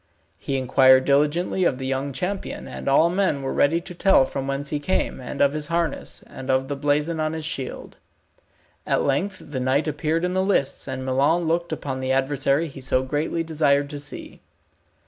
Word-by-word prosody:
He 135 - -2
inquired 130 0 +5
diligently 150 +6 +2
of 135 - +2
the 130 - -5
young 135 +1 -2
champion, 180 +9 -4
and - - -8
all 140 +4 +5
men 180 -7 0
were 135 - -2
ready 160 +4 +3
to 180 - -9
tell 180 -5 +4
from 135 0 -4
whence 140 +1 -3
he 150 - -1
came, 145 -1 -1
and 130 +3 -5
of 140 0 +4
his 150 -1 -2
harness, 165 -2 -2
and 130 0 -9
of 130 +1 +1
the 145 - -1
blazon 150 +3 0
on 155 0 -1
his 160 -1 -5
shield. 135 -4 -5 0.9
At - - +2
length 185 +8 -1
the 130 - -2
knight 130 +4 +1
appeared 155 +3 0
in 180 - -1
the 185 - +1
lists 190 -11 0
and 130 -1 -4
Milon 140 +6 +2
looked 170 +1 -1
upon 140 -4 -4
the 130 0 -2
adversary 135 +3 +1
he 135 -2 -10
so 130 0 +1
greatly 150 +5 -1
desired 145 -3 +1
to 145 - -5
see. 145 - -8
145 Hz, 195 wpm, -23 LUFS, 135-165 Hz, 0.9 s, inquired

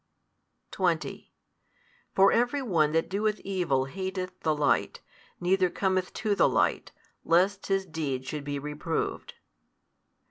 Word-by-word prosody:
20 - - -1 0.8
For 195 +1 +6
every 245 +4 +1
one 165 -10 +2
that 165 +1 +1
doeth 210 +2 -1
evil 175 -9 0
hateth 185 +4 -4
the 155 -1 +1
light, 150 -1 +1 0.4
neither 185 +1 +2
cometh 185 0 0
to 215 -3 0
the - - +4
light, - - +1 0.3
lest 190 +4 +2
his 195 -1 +1
deeds 145 -6 -3
should 150 -2 -4
be 145 0 -3
reproved. 150 +3 -3
185 Hz, 120 wpm, -28 LUFS, 150-195 Hz, 0.8 s, For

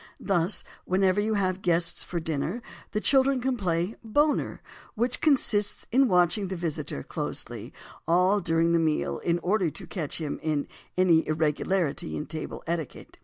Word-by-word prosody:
Thus, 185 0 0 0.2
whenever 190 +1 +2
you 215 +1 0
have 190 -1 0
guests 170 -1 +2
for 175 - -3
dinner, 160 - -3 0.3
the 210 - -1
children 270 +2 +3
can 260 +1 0
play 180 -1 -1
"Boner" 290 +7 +1 0.3
which 240 +2 0
consists 215 -9 +2
in 265 +3 +5
watching 180 +1 +3
the 190 - -4
visitor 155 - -3
closely - - -4 0.4
all 180 +4 +4
during 165 -2 +2
the 170 - +4
meal 160 -2 0
in 170 0 +1
order 190 -2 +2
to - - -9
catch 155 -6 -3
him 155 -3 -3
in 155 -2 -1 0.3
any 175 -3 +4
irregularity 160 +2 0
in 150 - -4
table 160 -1 -6
etiquette. 165 -4 -5
180 Hz, 155 wpm, -27 LUFS, 165-210 Hz, 0.4 s, in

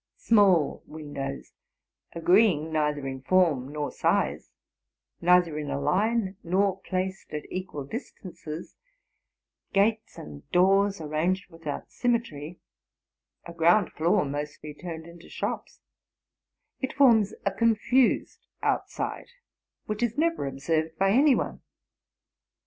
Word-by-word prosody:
Small 195 -9 +3
windows, 145 -3 -6 0.6
agreeing 170 -2 +3
neither 150 -2 0
in 130 -1 -5
form 150 -5 +2
nor 150 -1 -3
size, - - 0 0.7
neither 175 -3 +4
ip 150 - -5
a 140 0 -2
line 195 +6 0
nor 190 +2 +1
placed 190 0 -3
at 150 - -5
equal 185 -6 -5
distances; 170 - -8 1.0
gates 215 +3 +1
and 75 -1 -10
doors 195 +2 +3
arranged 170 +5 -1
without 165 -3 -6
symmetry; 180 - -2 0.9
2 170 - -9
ground 170 +4 +3
floor 175 +3 +2
mostly 150 +1 -5
turned 160 0 -7
into 170 0 -14
shops,— - - -5 1.0
it 265 - -3
forms 230 -7 +4
a 200 - +2
confused 230 +4 +1 0.2
outside, - - -2 0.6
which 215 +1 -4
is 240 +1 0
never 330 - +1
observed 155 +4 -2
by 195 +1 +3
any 270 +4 +5
one. - - -3
175 Hz, 110 wpm, -27 LUFS, 150-205 Hz, 1.0 s, any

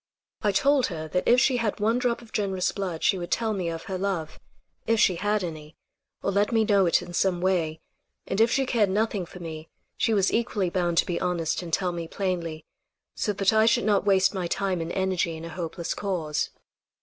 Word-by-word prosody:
I 210 - +2
told 275 +6 +3
her 160 -3 -5
that 180 +2 -1
if 245 - +6
she 255 0 +3
had 225 -3 -1
one 225 +4 +2
drop 245 -1 -1
of 225 - -17
generous 190 -3 0
blood 185 -5 -4
she 190 - +3
would 175 - -5
tell 225 -2 0
me 185 -4 -2
of 165 0 -5
her 190 -1 -4
love, 180 -5 -3 0.5
if 225 0 +2
she 185 - +5
had 205 +2 0
any, 155 -2 -7 0.5
or - - +1
let 205 +3 +1
me 225 -1 +3
know 200 -3 +4
it 170 - +3
in 175 0 -10
some 180 0 +1
way; 170 -4 0 0.4
and 195 +3 0
if 230 - +5
she 270 +3 +1
cared 225 -6 +2
nothing 205 -2 0
for 180 - -11
me 160 -2 -7 0.3
she - - +1
was 195 -2 +2
equally 210 -6 0
bound 175 -2 0
to - - +5
be 175 - -2
honest 175 -3 -1
and 170 -2 -7
tell 180 +2 +1
me 170 -1 -5
plainly, 170 -4 -3 0.5
so 210 - -1
that 195 +1 +2
I 220 0 +4
should 230 - +3
not 210 -2 +3
waste 195 -1 +3
my 185 -3 -2
time 185 -1 -1
and 165 +1 -4
energy 185 -3 0
in 160 - -8
a - - -6
hopeless 170 0 -4
cause. 170 -7 -2
190 Hz, 220 wpm, -26 LUFS, 170-210 Hz, 0.5 s, if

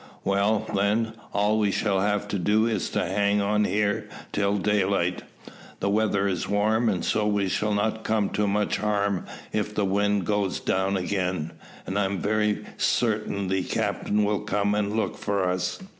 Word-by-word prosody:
"Well, 100 +2 +1
then, 105 +3 +1 0.2
all 105 +2 +2
we 105 -1 +2
shall 100 -1 +1
have 105 +1 0
to 100 - -1
do 105 +5 +3
is 110 -5 -1
to - - -1
hang 100 0 +1
on 105 +1 +2
here 105 +1 0 0.2
till 100 0 +1
daylight. 100 -3 +1 0.6
The 100 - 0
weather 100 -2 +2
is 95 -1 -2
warm, 105 -2 +1
so 105 -1 +1
we 100 -2 +1
shall 105 +3 0
not 110 +2 -1
come 110 -2 0
to 105 -1 0
much 105 +1 +1
harm 100 -3 0 0.3
if 105 0 -1
the 105 - +1
wind 100 0 +1
goes 105 -2 0
down 95 +1 0
again, 90 -3 -2 0.3
and 95 +2 -1
I 100 - +2
am 95 0 -2
very 105 +2 0
certain 105 -4 0
the 95 0 +1
captain 105 +3 0
will 105 0 +1
come 105 -1 0
and 105 0 0
look 110 - -1
for 100 -2 0
us." 90 0 -1
105 Hz, 175 wpm, -26 LUFS, 100-105 Hz, 0.6 s, do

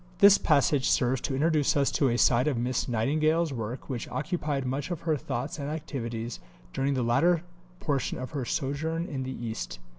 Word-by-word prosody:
This 200 0 +7
passage 140 0 +3
serves 125 +1 +2
to 135 - -2
introduce 150 0 +2
us 140 -1 +2
to 140 - +2
a 120 - +1
side 120 +2 +4
of 140 -5 +1
Miss 125 +2 -1
Nightingale's 155 +7 +1
work 115 +1 -5
which 125 -4 -4
occupied 145 -1 -2
much 135 +4 -2
of 175 -3 -4
her 160 -2 +1
thoughts 135 +2 -4
and 140 0 -3
activities 120 -7 -4 0.3
during 135 +1 0
the 125 - 0
latter 165 +9 +3 0.4
portion 145 -9 -1
of 130 - -6
her 140 -3 -3
sojourn 155 +7 -2
in 140 -6 -4
the 130 -2 -5
East. - - -4
135 Hz, 185 wpm, -28 LUFS, 125-155 Hz, 0.4 s, This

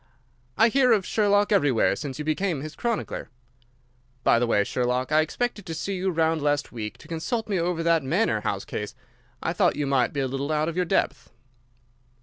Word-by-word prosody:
"I 225 +2 +6
hear 255 +1 +4
of 200 -4 +1
Sherlock 205 -1 +2
everywhere 145 - +3
since 140 -3 -6
you 150 - -5
became 155 -1 -1
his 155 +1 -7
chronicler. 235 -2 -3 0.9
By 115 - +4
the 120 - +1
way, 105 -3 +3
Sherlock, 125 +4 -1
I 155 +1 +5
expected 215 +7 -2
to 165 - -4
see 195 +4 -3
you 190 +1 -1
round 160 -2 +1
last 145 0 0
week, 110 -3 -6
to - - -15
consult 175 +8 -3
me 200 -4 0
over 170 -1 -1
that 165 -1 +3
Manor 135 - +1
House 100 -1 -2
case. 105 0 -5 0.5
I 165 - 0
thought 180 -2 +2
you 150 - -1
might 135 -2 +2
be 140 - -3
a 135 - 0
little 135 +3 -3
out 155 0 +1
of 165 - -3
your 180 0 +1
depth." - - 0
160 Hz, 200 wpm, -25 LUFS, 135-195 Hz, 0.9 s, I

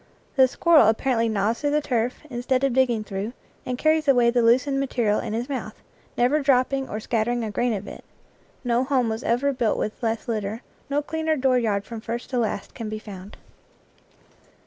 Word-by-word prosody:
The 265 -1 +6
squirrel 310 -2 +5
ap 220 0 +3
parently 235 -4 +1
gnaws 215 +2 0
through 290 - +1
the 300 +1 +2
turf, 245 -3 -1
instead 255 0 -1
of 275 -2 +2
dig 260 +1 +4
ging 230 -3 -2
through, 205 +2 -5 0.3
and 250 -1 -2
carries 310 +1 +2
away 245 -3 +5
the 240 0 +2
loosened 255 +4 +3
mate 275 -1 -4
rial 215 -3 +2
in - - -4
his 235 +3 -2
mouth, 245 -6 -5 0.4
never 255 +5 +3
dropping 270 0 +2
or 215 - -3
scattering 235 +2 -1
a 215 - -3
grain 240 +4 0
of 200 0 -6
it. - - -9 0.6
No 245 0 +1
home 260 -3 +1
was 220 +1 -3
ever 265 +4 +1
built 240 -4 0
with 215 - -3
less 225 -2 -2
lit 225 -2 -1
ter, 210 +4 -5 0.3
no 290 +1 0
cleaner 320 +1 -1
dooryard 245 -6 +1
from 230 -2 -7
first 235 +3 -5
to 250 - 0
last 215 -3 -2
can 225 -2 -6
be 215 - -4
found. 200 -2 -10
240 Hz, 205 wpm, -24 LUFS, 220-265 Hz, 0.6 s, The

